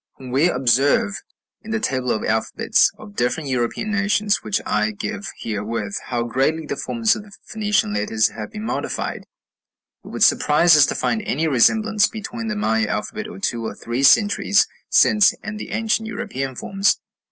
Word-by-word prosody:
When 130 Hz, -2 st, -10 dB
we 145 Hz, +7 st, +3 dB
observe, 140 Hz, -, +2 dB, 0.4 s
in 220 Hz, -, -12 dB
the 220 Hz, 0 st, -1 dB
table 130 Hz, -11 st, -2 dB
of 110 Hz, -, -1 dB
alphabets 110 Hz, 0 st, +2 dB
of 100 Hz, -, -13 dB
different 125 Hz, +6 st, -1 dB
European 125 Hz, -, -2 dB
nations 205 Hz, +1 st, +1 dB
which 105 Hz, -2 st, -2 dB
I 105 Hz, 0 st, +1 dB
give 205 Hz, -, -5 dB
herewith, 105 Hz, -1 st, -4 dB
how 120 Hz, -2 st, -1 dB
greatly 135 Hz, +7 st, 0 dB
the -, -, -4 dB
forms 225 Hz, -2 st, 0 dB
of -, -, -6 dB
the 205 Hz, 0 st, -16 dB
Phoenician 210 Hz, -, 0 dB
letters 110 Hz, +1 st, +1 dB
have 105 Hz, -1 st, -7 dB
been 210 Hz, -, -7 dB
modified, -, -, -4 dB, 0.8 s
it -, -, -14 dB
would -, -, -1 dB
surprise 155 Hz, +2 st, +5 dB
us 150 Hz, -3 st, +6 dB
to -, -, -3 dB
find 220 Hz, -, -1 dB
any 160 Hz, -6 st, -1 dB
resemblance 210 Hz, -, +3 dB
between 225 Hz, +1 st, -6 dB
the 215 Hz, -, -2 dB
Maya 110 Hz, -, 0 dB
alphabet -, -, -4 dB
of 95 Hz, -, -10 dB
two 115 Hz, -1 st, -1 dB
or 110 Hz, -, -5 dB
three 120 Hz, +3 st, -4 dB
centuries 205 Hz, +7 st, +4 dB, 0.2 s
since 210 Hz, -2 st, +5 dB
and 210 Hz, 0 st, -6 dB
the -, -, -7 dB
ancient 225 Hz, 0 st, -1 dB
European 200 Hz, -, -4 dB
forms. 195 Hz, +9 st, +1 dB
150 Hz, 175 wpm, -21 LUFS, -, 0.8 s, us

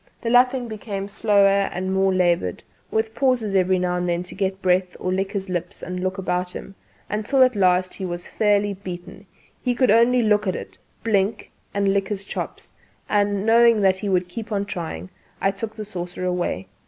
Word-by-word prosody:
The 230 Hz, -, -2 dB
lapping 250 Hz, 0 st, +4 dB
became 205 Hz, -3 st, -5 dB
slower 200 Hz, -1 st, +3 dB
and 185 Hz, +1 st, -2 dB
more 190 Hz, 0 st, +3 dB
laboured, 175 Hz, -, +1 dB, 0.3 s
with 220 Hz, 0 st, -1 dB
pauses 250 Hz, -6 st, +1 dB
every 185 Hz, -1 st, +3 dB
now 180 Hz, 0 st, 0 dB
and 180 Hz, 0 st, -1 dB
then 175 Hz, +1 st, 0 dB
to 180 Hz, -, -9 dB
get 190 Hz, -1 st, -2 dB
breath 180 Hz, -1 st, +1 dB
or 185 Hz, -, -1 dB
lick 195 Hz, +1 st, -1 dB
his 195 Hz, -1 st, -3 dB
lips 180 Hz, -2 st, -4 dB
and 180 Hz, 0 st, -4 dB
look 185 Hz, +1 st, -2 dB
about 180 Hz, -1 st, -2 dB
him, 195 Hz, -, -8 dB, 0.3 s
until 220 Hz, +6 st, +2 dB
at 255 Hz, -2 st, +3 dB
last 185 Hz, -2 st, +2 dB
he 195 Hz, -, -7 dB
was 175 Hz, -1 st, -4 dB
fairly 205 Hz, -1 st, +1 dB
beaten: 190 Hz, +1 st, -9 dB, 0.3 s
he 250 Hz, -1 st, 0 dB
could 255 Hz, -2 st, +3 dB
only 235 Hz, +2 st, +5 dB
look 210 Hz, -1 st, +2 dB
at 185 Hz, -, 0 dB
it, -, -, -7 dB, 0.3 s
blink 210 Hz, -1 st, 0 dB, 0.2 s
and 200 Hz, -1 st, +1 dB
lick 195 Hz, -1 st, 0 dB
his 200 Hz, -1 st, -4 dB
chops; -, -, -6 dB, 0.4 s
and, 205 Hz, -1 st, +1 dB
knowing 230 Hz, 0 st, +5 dB
that 190 Hz, -1 st, +4 dB
he 200 Hz, +1 st, -3 dB
would 180 Hz, -2 st, +1 dB
keep 225 Hz, +5 st, -7 dB
on 200 Hz, -1 st, 0 dB
trying, 160 Hz, -, -6 dB, 0.3 s
I 195 Hz, -, +2 dB
took 215 Hz, +2 st, -6 dB
the 215 Hz, -1 st, -6 dB
saucer 180 Hz, -2 st, -5 dB
away. 175 Hz, -, -2 dB
195 Hz, 195 wpm, -23 LUFS, 185-215 Hz, 0.4 s, only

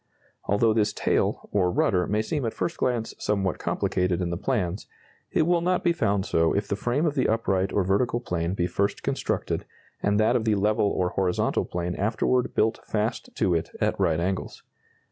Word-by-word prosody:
Although 110 Hz, +2 st, +3 dB
this 105 Hz, -1 st, +1 dB
tail, -, -, 0 dB
or 95 Hz, -3 st, +2 dB
rudder, 90 Hz, 0 st, +1 dB
may 105 Hz, +1 st, +1 dB
seem 145 Hz, +4 st, -2 dB
at 115 Hz, -, -2 dB
first 170 Hz, -, -2 dB
glance 120 Hz, -3 st, -1 dB
somewhat 95 Hz, -4 st, -1 dB
complicated 90 Hz, -1 st, 0 dB
in 90 Hz, -2 st, -1 dB
the -, -, -1 dB
plans, 95 Hz, -2 st, -2 dB, 0.4 s
it -, -, +3 dB
will 170 Hz, +1 st, +2 dB
not 180 Hz, +1 st, +1 dB
be 175 Hz, -2 st, +3 dB
found 100 Hz, -, 0 dB
so 80 Hz, 0 st, +2 dB
if 100 Hz, 0 st, -1 dB
the 100 Hz, -, -1 dB
frame 125 Hz, +9 st, 0 dB
of 155 Hz, -, +1 dB
the 140 Hz, -, +1 dB
upright 95 Hz, -4 st, +1 dB
or 100 Hz, -, +1 dB
vertical 110 Hz, +6 st, +1 dB
plane 90 Hz, -5 st, -2 dB
be 85 Hz, -, 0 dB
first 100 Hz, +3 st, -1 dB
constructed, -, -, -1 dB, 0.4 s
and 105 Hz, +1 st, +2 dB
that 110 Hz, +3 st, +3 dB
of 120 Hz, -, +1 dB
the 110 Hz, -2 st, +3 dB
level 105 Hz, +1 st, +2 dB
or 90 Hz, -2 st, 0 dB
horizontal 90 Hz, -1 st, 0 dB
plane 90 Hz, 0 st, -3 dB
afterward 120 Hz, +5 st, 0 dB
built 110 Hz, +1 st, +2 dB
fast 110 Hz, +2 st, -2 dB
to 90 Hz, -, +1 dB
it 80 Hz, -1 st, -1 dB
at -, -, 0 dB
right 85 Hz, -4 st, +2 dB
angles. 95 Hz, +2 st, -3 dB
105 Hz, 195 wpm, -26 LUFS, 90-115 Hz, 0.4 s, Although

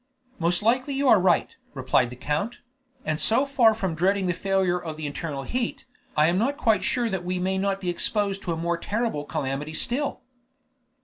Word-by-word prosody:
"Most 175 Hz, +3 st, +1 dB
likely 255 Hz, +5 st, +1 dB
you 275 Hz, 0 st, +1 dB
are 210 Hz, -, +6 dB
right," 180 Hz, -2 st, +2 dB, 0.2 s
replied 130 Hz, -1 st, +2 dB
the 125 Hz, -, -9 dB
count; 150 Hz, -, -2 dB, 0.5 s
"and 155 Hz, 0 st, -1 dB
so 245 Hz, +5 st, +3 dB
far 245 Hz, -6 st, +4 dB
from 190 Hz, -6 st, -2 dB
dreading 190 Hz, +3 st, +1 dB
a -, -, -1 dB
failure 190 Hz, -1 st, 0 dB
of 160 Hz, -3 st, -6 dB
the 155 Hz, -, -5 dB
internal 145 Hz, -1 st, -4 dB
heat, 245 Hz, -, -3 dB, 0.3 s
I 150 Hz, -, +5 dB
am 175 Hz, +3 st, +2 dB
not 275 Hz, +6 st, 0 dB
quite 215 Hz, -5 st, +2 dB
sure 240 Hz, +4 st, +1 dB
that 190 Hz, -5 st, -3 dB
we 180 Hz, +1 st, -2 dB
may 190 Hz, +1 st, 0 dB
not 195 Hz, 0 st, 0 dB
be 180 Hz, -, -3 dB
exposed 200 Hz, +2 st, 0 dB
to 175 Hz, -, -3 dB
a 165 Hz, -, -2 dB
more 170 Hz, +1 st, -1 dB
terrible 210 Hz, -7 st, -2 dB
calamity 145 Hz, +2 st, -3 dB
still?" 275 Hz, -, 0 dB
185 Hz, 195 wpm, -25 LUFS, 160-225 Hz, 0.5 s, are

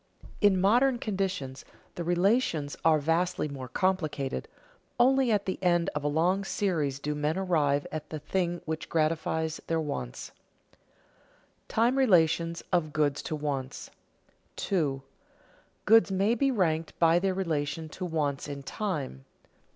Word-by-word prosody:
In 200 Hz, -3 st, +5 dB
modern 245 Hz, +7 st, +4 dB
conditions 190 Hz, -, -3 dB, 0.3 s
the 175 Hz, -, -4 dB
relations 175 Hz, -, +1 dB
are 160 Hz, -1 st, +5 dB
vastly 165 Hz, +2 st, 0 dB
more 135 Hz, -3 st, -7 dB
complicated; 155 Hz, -, -1 dB, 0.5 s
only 260 Hz, 0 st, +4 dB
at 205 Hz, -2 st, +1 dB
the 185 Hz, -, -3 dB
end 175 Hz, -2 st, +2 dB
of 150 Hz, -, -3 dB
a -, -, +1 dB
long 175 Hz, +6 st, +1 dB
series 165 Hz, -9 st, -1 dB
do 150 Hz, +1 st, -3 dB
men 150 Hz, +3 st, -1 dB
arrive 150 Hz, -7 st, +1 dB
at 155 Hz, -1 st, -6 dB
the 155 Hz, -, -4 dB
thing 175 Hz, +3 st, -2 dB
which 160 Hz, 0 st, -4 dB
gratifies 160 Hz, 0 st, 0 dB
their 165 Hz, 0 st, +1 dB
wants. 105 Hz, -, -5 dB, 0.4 s
[Sidenote: -, -, -30 dB, 0.9 s
Time 235 Hz, +4 st, +2 dB
relations 170 Hz, -7 st, +3 dB
of 155 Hz, -4 st, +1 dB
goods 145 Hz, -2 st, +1 dB
to 155 Hz, -, -4 dB
wants] 140 Hz, -3 st, -4 dB, 0.6 s
2. 145 Hz, -8 st, -1 dB, 0.8 s
_Goods 225 Hz, 0 st, +6 dB
may 195 Hz, +4 st, +2 dB
be 275 Hz, +4 st, +2 dB
ranked 165 Hz, -9 st, 0 dB
by 165 Hz, 0 st, +4 dB
their 190 Hz, 0 st, 0 dB
relation 160 Hz, -4 st, -2 dB
to 185 Hz, -, -7 dB
wants 150 Hz, -6 st, -1 dB
in 140 Hz, -1 st, -6 dB
time. 145 Hz, -, -4 dB
165 Hz, 140 wpm, -28 LUFS, 150-190 Hz, 0.9 s, Goods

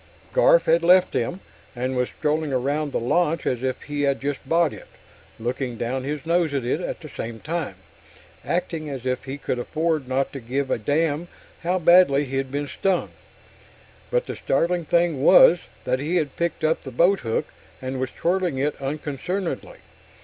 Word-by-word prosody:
Garf -, -, +5 dB
had 170 Hz, -, +3 dB
left 180 Hz, +2 st, +5 dB
them, 175 Hz, +11 st, -2 dB, 0.3 s
and 130 Hz, +2 st, -2 dB
was 125 Hz, -1 st, 0 dB
strolling 150 Hz, 0 st, -1 dB
around 140 Hz, +3 st, 0 dB
the -, -, -1 dB
launch 165 Hz, +6 st, +1 dB
as 125 Hz, -2 st, 0 dB
if 130 Hz, 0 st, -2 dB
he 145 Hz, 0 st, -3 dB
had 140 Hz, -1 st, +1 dB
just 140 Hz, 0 st, -4 dB
bought 165 Hz, -2 st, +3 dB
it -, -, -11 dB, 0.5 s
looking 120 Hz, +1 st, -3 dB
down 130 Hz, +3 st, -2 dB
his 145 Hz, 0 st, -4 dB
nose 165 Hz, -3 st, +1 dB
at 135 Hz, -, 0 dB
it; 140 Hz, +7 st, 0 dB
at -, -, -4 dB
the 155 Hz, -, -8 dB
same 115 Hz, -5 st, -6 dB
time, 160 Hz, -, -3 dB, 0.7 s
acting 165 Hz, -3 st, -2 dB
as 130 Hz, -3 st, -6 dB
if 130 Hz, 0 st, -1 dB
he 135 Hz, +1 st, -5 dB
could 125 Hz, -3 st, -3 dB
afford 155 Hz, +1 st, -1 dB
not 130 Hz, +1 st, -1 dB
to 135 Hz, -, -5 dB
give 135 Hz, +3 st, -2 dB
a -, -, +1 dB
damn 150 Hz, +6 st, 0 dB, 0.3 s
how 180 Hz, +2 st, +1 dB
badly 170 Hz, -5 st, +5 dB
he'd 135 Hz, 0 st, -3 dB
been 145 Hz, +1 st, -2 dB
stung. 190 Hz, +3 st, 0 dB, 1.0 s
But -, -, +1 dB
the -, -, -5 dB
startling 175 Hz, 0 st, 0 dB
thing 170 Hz, -3 st, +2 dB
was 175 Hz, +3 st, +8 dB, 0.2 s
that 130 Hz, 0 st, 0 dB
he 155 Hz, +6 st, -1 dB
had 150 Hz, -6 st, 0 dB
picked 170 Hz, -1 st, -2 dB
up 155 Hz, +1 st, +2 dB
the 135 Hz, -, -6 dB
boathook 130 Hz, -, +1 dB, 0.3 s
and 130 Hz, 0 st, -4 dB
was 130 Hz, -1 st, -1 dB
twirling 175 Hz, -2 st, 0 dB
it 145 Hz, +2 st, 0 dB
unconcernedly. 155 Hz, -, -4 dB
145 Hz, 180 wpm, -24 LUFS, 130-170 Hz, 1.0 s, was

